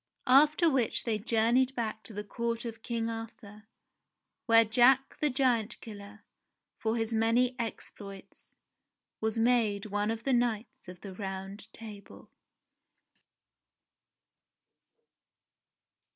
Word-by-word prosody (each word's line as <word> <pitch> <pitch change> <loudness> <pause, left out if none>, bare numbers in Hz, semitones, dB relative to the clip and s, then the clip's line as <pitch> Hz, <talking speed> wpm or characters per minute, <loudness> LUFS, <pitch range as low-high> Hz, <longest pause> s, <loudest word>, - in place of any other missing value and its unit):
After 300 +5 +5
which 265 -7 +1
they 220 -3 -1
journeyed 240 +4 +2
back 220 -2 -3
to - - -4
the 210 +1 -5
court 235 +2 -3
of 225 -1 -7
King 230 -1 -2
^ - - -1
Arthur, 225 -2 -9 0.8
where 230 -1 +6
Jack 250 +4 +4
the 300 - +2
Giant 250 -5 +1
Killer, 205 -1 -11 0.6
for 225 +1 -1
his 225 0 -2
many 230 +3 +2
exploits, 200 -3 -8
I - - -58
was 220 0 -1
made 225 -4 +2
one 205 0 -1
of 225 0 -3
the 270 - +1
Knights 235 -4 -1
of 180 0 -11
the 195 -2 -8
Round 195 +1 -6
Table. 210 -3 -11
225 Hz, 120 wpm, -30 LUFS, 210-240 Hz, 0.8 s, where